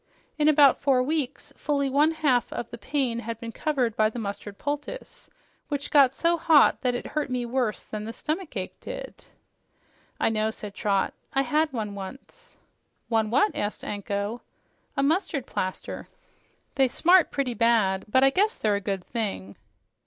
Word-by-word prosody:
In 300 - +3
about 290 -3 +6
four 265 -3 +3
weeks 285 -1 -3
fully 280 -2 0
one 285 +4 +4
half 295 -7 +1
of 235 - -4
the 235 - -7
pain 260 -1 -1
had 230 -1 -5
been 230 0 -6
covered 255 -4 -1
by 215 0 +3
the 220 - -9
mustard 200 -2 -5
poultice, 295 - -6 0.4
which 285 -1 -4
got 270 -3 +5
so 340 0 +2
hot 315 -2 +5
that 250 -2 +1
it - - -4
hurt 300 -2 -2
me 250 -1 -1
worse 240 -3 -1
than 215 0 -6
the 225 - -4
stomach 310 +8 -4
ache - - -5
did." - - -8 0.9
"I - - +3
know," 215 0 0
said 210 -2 -8
Trot. 200 -2 0 0.2
"I 270 - +2
had 300 +4 +1
one, 215 -5 -3
once." 275 - -10 0.5
"One 220 -2 +1
what?" 280 - +2
asked 205 +1 -3
Anko. 205 +2 -3 0.6
"A 275 - +2
mustard 315 -2 0
plaster. 185 0 -4 0.7
They 270 -1 +3
smart 350 +7 +4
pretty 270 -3 -1
bad, 215 -4 +2
but 260 +5 +3
I 270 - +6
guess 415 +8 +1
they're 215 -1 +1
a - - -5
good 195 -2 -3
thing." 195 - -4
255 Hz, 170 wpm, -26 LUFS, 215-295 Hz, 0.9 s, about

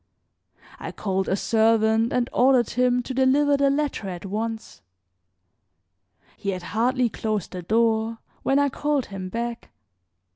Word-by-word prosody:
I - - -6
called 190 -2 -2
a 190 - +2
servant 225 +1 +2
and 245 -1 +1
ordered 250 -2 +3
him 250 0 +2
to 260 - -5
deliver 275 +3 +3
the 280 0 +3
letter 280 -8 -1
at 180 +1 -7
once. 220 - -5 1.6
He 200 - -4
had 185 -2 -3
hardly 245 +5 +1
closed 215 -3 -3
the 180 - -6
door 225 +3 +1 0.2
when 270 - +1
I 285 0 +3
called 290 0 -1
him 190 -2 -7
back. 235 +3 -4
230 Hz, 140 wpm, -24 LUFS, 210-255 Hz, 1.6 s, ordered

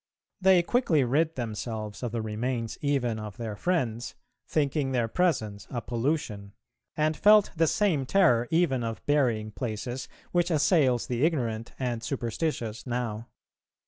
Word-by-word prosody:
They 185 -2 +5
quickly 175 - +2
rid 155 +6 +1
themselves 110 -3 -4
of 120 -3 -3
the 115 -1 -2
remains 115 +1 -2
even 130 -6 0
of 105 -2 -7
their 110 -3 -4
friends, 120 - -1 0.3
thinking 140 -2 0
their 120 -2 +1
presence 110 - 0
a 125 - -3
pollution, 115 -5 -2 0.4
and 155 +1 +2
felt 210 +2 +5
the 165 0 +3
same 155 -9 +1
terror 135 -10 +4
even 160 -7 +2
of 115 -4 -5
burying 120 -7 +1
places 120 +2 -4 0.2
which 175 0 +2
assails 150 -6 +3
the 125 +1 -1
ignorant 120 -8 -1
and 120 -3 -2
superstitious 120 -2 -3
now. 120 -2 -3
125 Hz, 140 wpm, -28 LUFS, 115-155 Hz, 0.4 s, They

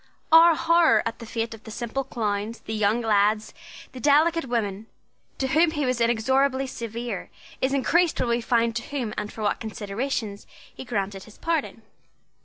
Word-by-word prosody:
Our 330 +1 +8
horror 335 -8 +4
at 230 0 -4
the 230 - -9
fate 225 0 -3
of 225 0 -12
the - - -10
simple 235 +4 -3
clowns, 215 -3 -3
the 220 - -6
young 215 +2 +1
lads, 215 -1 +2 0.4
the 255 - -9
delicate 315 +5 +3
women, 220 -4 -2 0.5
to 265 - -1
whom 320 +5 +4
he 295 -3 -2
was 255 -2 0
inexorably 260 +4 +2
severe, 235 -4 -5 0.3
is 260 - +1
increased 330 +5 +2
when 240 - 0
we 235 0 +1
find 230 -1 +1
to - - -2
whom 250 -7 -4
and 210 0 -4
for 220 - -7
what 205 - 0
considerations 215 0 -4 0.3
he - - -9
granted 200 -4 -3
his 215 - -16
pardon. 320 -9 -2
235 Hz, 175 wpm, -25 LUFS, 215-270 Hz, 0.5 s, Our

